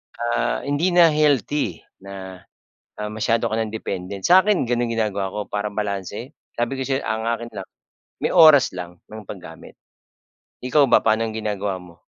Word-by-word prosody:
Ah, 120 0 -1
hindi 155 +6 0
na 170 -2 +7
healthy, 145 - +1 0.2
na, 95 -1 -9 0.6
ah, 105 - -3
masyado 110 +2 0
ka 110 - -1
ng 110 -1 -2
dependent. 95 -2 -5
Sakin 190 +2 +5
ganun 120 -1 0
ginagawa 100 -4 -1
ko 105 - -3
para 105 0 -3
balanse. 105 - -4 0.2
Sabi 120 +3 -2
ko - - -4
sa'yo, 135 0 -1
ang 110 +2 -3
akin 115 0 -2
lang, 100 -4 -7 0.5
may - - -1
oras 155 - +7
lang 90 -1 -7
ng 110 0 -10
paggamit. 90 -5 -11 0.9
Ikaw 140 +2 +3
ba, - - +4
pa'nong 110 0 +1
ginagawa 105 -3 -2
mo? 90 -2 -14
110 Hz, 160 wpm, -22 LUFS, 100-130 Hz, 0.9 s, na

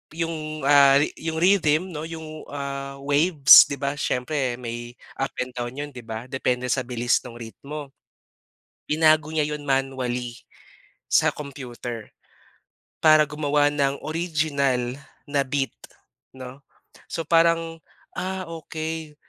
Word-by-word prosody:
yung, 155 -2 -4
ah, 140 -1 +6 0.2
yung 160 0 -3
rhythm 175 -1 +3
'no, 155 -1 -5
yung, 160 -1 -8
ah, 140 -1 -5
waves, 145 0 +7
'di 140 - -3
ba, 140 0 -2
siyempre 130 -2 -1
may 120 0 -7 0.2
up 135 - -2
and 125 - -10
down 120 0 -5
yun, 145 +1 -5
'di 130 - -10
ba, 110 0 -7
depende 125 -2 -1
sa - - +2
bilis 120 -1 +1
nong 120 - -11
ritmo. 140 +5 -8 1.0
Binago 155 0 +4
niya 155 -2 +1
'yon 150 - -7
manually 130 -3 -1 0.8
sa - - +5
computer 125 -5 -7 0.9
para 155 -1 +6
gumawa 150 -1 +1
ng 140 -1 -1
original 145 -6 -1 0.3
na 145 -1 0
beat, 135 -2 -1 0.6
'no? 130 +1 -9 0.5
So, 165 - -4
parang, 165 0 +2 0.4
ah, 185 +1 -3 0.2
okey 160 -1 -5
145 Hz, 125 wpm, -24 LUFS, 130-155 Hz, 1.0 s, waves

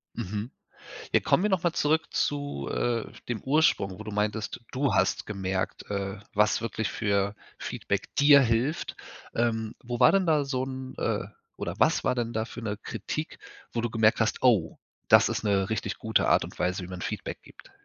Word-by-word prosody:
Mhm. 105 +6 -4 0.6
Ja - - +6
kommen 185 - +2
wir 210 - +2
noch 190 -4 +1
mal 175 -2 +2
zurück 160 +1 +2
zu, 145 - -1
äh, 120 -2 0 0.2
dem 115 -4 -2
Ursprung, 130 -10 +2
wo 110 - -6
du 105 - -6
meintest, 105 +2 -2
du 135 -4 0
hast 95 0 +2
gemerkt, 95 -2 -3
äh, 100 0 -2 0.2
was 105 +1 +3
wirklich 110 -1 -2
für 100 -1 0 0.2
Feedback - - -3
dir 145 0 +7
hilft, 125 +6 0 0.4
ähm, 110 -2 0
wo 120 -1 -4
war 125 - +7
denn 195 -1 +3
da 155 -3 +3
so 130 -2 -2
'n, 130 -1 -7
äh - - -1 0.3
oder - - -4
was - - +3
war 125 - +1
denn 120 -1 -2
da 110 0 -1
für 120 - -9
'ne 105 -2 -2
Kritik, - - -5 0.4
wo 115 - 0
du 120 - -1
gemerkt 110 0 +3
hast: 110 - 0
„Oh, 110 -11 +3 0.3
das - - +6
ist - - -2
'ne 100 -1 +1
richtig 110 - -2
gute - - +1
Art - - +4
und - - -9
Weise, 90 +1 0
wie 90 - -7
man 90 -1 -7
Feedback - - -4
gibt?“ - - -17
115 Hz, 190 wpm, -28 LUFS, 100-130 Hz, 0.6 s, dir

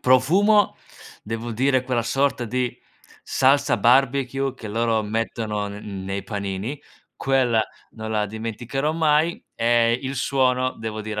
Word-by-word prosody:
profumo, 185 +12 +4 0.5
devo 115 +2 -4
dire 130 +2 +2
quella 125 -2 0
sorta 135 +1 0
di 125 +2 -2 0.5
salsa 135 -1 +3
barbecue 135 +3 +2
che 110 -4 -9
loro 115 0 +1
mettono 105 -1 -2
n 100 -2 -7
nei 95 +1 -3
panini: 100 +6 -4 0.4
quella, 125 -5 +2 0.3
non 110 -1 -6
la 105 -1 0
dimenticherò 115 +7 -3
mai. 160 +1 +2
E 115 0 +3
il 135 0 -4
suono 130 -1 +1
devo 110 -1 -5
dire, 105 0 -4
120 Hz, 130 wpm, -23 LUFS, 110-135 Hz, 0.5 s, profumo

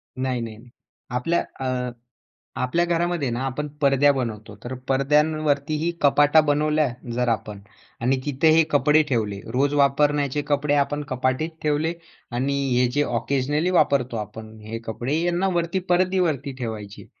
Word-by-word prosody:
नाही, 130 -2 -2
नाही, 110 -2 -6
नाही, 120 +2 -16 0.5
आपल्या 165 +7 +1 0.3
अ, 125 -1 -2 0.7
आपल्या 150 +7 +1
घरामध्ये 170 -4 0
ना, 120 +2 -3
आपण 150 +3 -3 0.2
परद्या 140 +1 +5
बनवतो. 110 -5 -4
तर 130 +2 -4
परद्यांवरती 150 +2 +1
ही 170 - +1
कपाटा 145 +2 +5
बनवल्या 150 +1 +2 0.3
जर 125 0 0
आपण 105 -2 -2 0.4
आणि 130 +2 +2
तिथे 145 +2 +2
हे 165 - +7
कपडे 150 +2 +4
ठेवले, 105 -6 -1
रोज 140 +3 +1
वापरण्याचे 145 0 +2
कपडे 145 0 +1
आपण 145 +1 +1
कपाटीत 130 +5 0
ठेवले 155 +2 +1 0.4
आणि 135 +3 0 0.2
हे 125 0 +4
जे 145 +1 +2
ऑकेजनली 140 +7 0
वापरतो 130 -8 +2
आपण, 110 +1 -7
हे 110 +2 -6
कपडे, 120 +6 -3
यांना 175 +2 +1
वरती 170 +2 0
परदीवरती 175 -6 +1
ठेवायचे. 105 -4 -6
140 Hz, 145 wpm, -23 LUFS, 125-150 Hz, 0.7 s, हे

